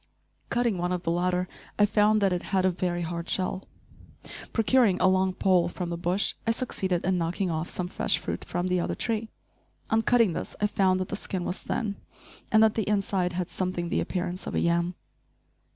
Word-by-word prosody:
Cutting 235 -6 +1
one 175 +1 -1
of 180 -1 -2
the 165 - 0
latter, 180 +1 0 0.3
I 205 - +6
found 210 0 +3
that 195 -2 +3
it 175 - -1
had 190 -2 +2
a 185 - +4
very 175 -1 -2
hard 170 +1 -4
shell. 185 0 -1 0.8
Procuring 225 -4 +3
a - - +4
long 185 0 +3
pole 180 -2 +2
from 175 -1 -4
the - - -1
bush, 180 +4 +1
I - - +3
succeeded 190 -7 -1
in 185 -1 +2
knocking 170 +2 -1
off 160 +1 -2
some 180 - -3
fresh - - +1
fruit - - -4
from 175 - -2
the 180 0 +1
other - - -1
tree. 225 -1 -1 0.6
On 220 0 +4
cutting 230 -5 +3
this - - -5
I 210 - +2
found 190 -2 +2
that 185 - -3
the - - -2
skin 185 -3 -3
was 180 - -3
thin, 210 -4 -2 0.5
and 220 0 +6
that 220 -1 +5
the 220 -3 -1
inside 195 -3 0
had 180 0 -3
something 180 -2 -2
the - - +1
appearance 180 0 -3
of - - -3
a - - +2
yam. 170 +1 +1
185 Hz, 205 wpm, -27 LUFS, 175-205 Hz, 0.8 s, I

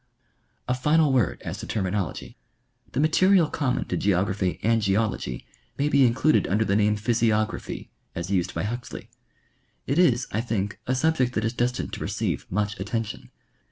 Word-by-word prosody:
A 125 - +1
final 150 +3 +3
word 125 -7 +1
as - - -5
to - - -7
terminology. 95 -3 -3 0.6
The 130 - -1
material 170 +3 +4
common 140 -5 -1
to - - 0
ge - - -2
ography 95 -1 +1
and 115 0 +3
geology 100 - -1 0.3
may 145 +1 +1
be 140 -3 +5
included 130 +6 +2
under 105 +4 +1
the 100 - +1
name 105 0 +3
physiogra 110 -1 +1
phy, - - -7 0.3
as 85 +3 -4
used 90 -3 0
by 85 - -1
Huxley. 120 +4 -6 0.7
It 140 +5 0
is, 125 -8 +4
I 110 - 0
think, 105 -4 -3
a 130 - +1
subject 130 -3 +1
that 110 -2 -1
is 115 - -1
destined 125 +1 -1
to - - -4
receive - - -2
much 105 +2 -1
attention. 110 +2 -4
115 Hz, 170 wpm, -25 LUFS, 100-130 Hz, 0.7 s, be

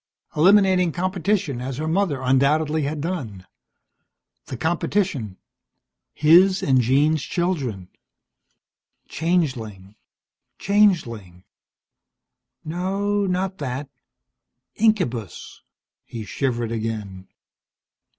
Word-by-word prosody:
Eliminating 185 +1 +4
competition 180 -6 -1
as 130 0 -5
her 155 +2 -3
mother 160 -6 0
undoubtedly 150 +4 +2
had 150 +1 -3
done. 125 - -5 1.0
The 130 - -6
competition 160 - -1 0.7
his 180 +5 +4
and 130 -2 +3
Jean's 145 +5 +2
children! 140 - -2 1.2
Changeling, 125 - -2 0.6
changeling 120 - +1 1.2
No, 195 +5 -1
not 185 +1 -2
that. 135 +1 -4 0.9
Incubus! 170 - -1 0.4
He 115 -2 -8
shivered 120 -2 -2
again. 110 -4 -5
150 Hz, 75 wpm, -22 LUFS, 120-185 Hz, 1.2 s, Eliminating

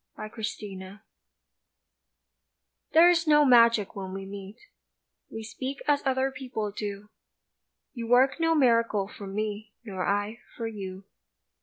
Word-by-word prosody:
AFTER 215 +1 -8 0.2
LOVE 190 -1 -8 2.0
THERE 335 +2 +8
is 340 -1 +1
no 295 -1 +6
magic 230 -5 +5
when 190 -1 -6
we 195 0 -6
meet, 195 +1 -9 0.7
We 225 - -7
speak 260 +5 -6
as 290 -1 +3
other 265 0 +1
people 250 -6 -4
do, 205 0 -6 0.8
You 235 -4 -5
work 255 +5 +4
no 330 0 +2
miracle 230 -7 +3
for 200 -1 -10
me 210 +1 -4
Nor 190 -5 -4
I 205 +3 -1 0.2
for 230 - -4
you. 195 -4 -6
220 Hz, 130 wpm, -27 LUFS, 200-260 Hz, 2.0 s, THERE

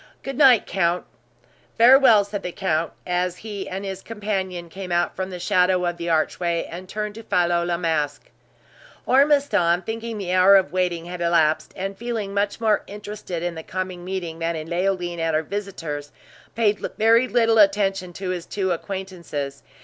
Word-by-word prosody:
Good 270 - -5
night, 260 -5 +6
count." 175 -2 0 0.7
"Farewell," 235 -3 +7
said 205 0 -5
the 180 - -4
count, 165 -4 -1
as 180 0 -1
he 205 -3 -6
and, 195 +2 -5
his 190 -1 -5
companion 195 -5 -4
came 185 +2 -8
out 175 0 +1
from 190 0 -3
the 180 - -6
shadow 180 -1 +2
of 175 0 -2
the 170 0 -4
archway, 170 +1 0
and 180 +2 -8
turned 210 -1 -4
to 225 - -9
follow 175 -3 +1
La 175 0 -1
Masque. 155 -4 -2 0.7
Ormiston, 265 - +3
thinking 225 +3 -5
the 185 -3 -3
hour 185 +2 +7
of 190 -1 +3
waiting 180 -2 -1
had 175 0 -7
elapsed, 165 -2 +2
and 195 +1 -4
feeling 225 -3 -4
much 205 +2 -1
more 220 -2 +2
interested 205 -4 -6
in 175 -1 -2
the 160 - -7
coming 185 +1 -5
meeting 175 -3 -5
than 165 0 -1
in 155 0 -5
Leoline 175 -1 -1
or 165 -1 0
her 155 +1 +1
visitors, 165 -7 -5 0.4
paid 210 -2 +2 0.2
very 230 +3 +4
little 230 -2 +3
attention 195 -2 +3
to 190 +1 -5
his 175 -2 -5
two 190 -2 -1
acquaintances. 175 -6 -5
185 Hz, 170 wpm, -23 LUFS, 170-205 Hz, 0.7 s, Farewell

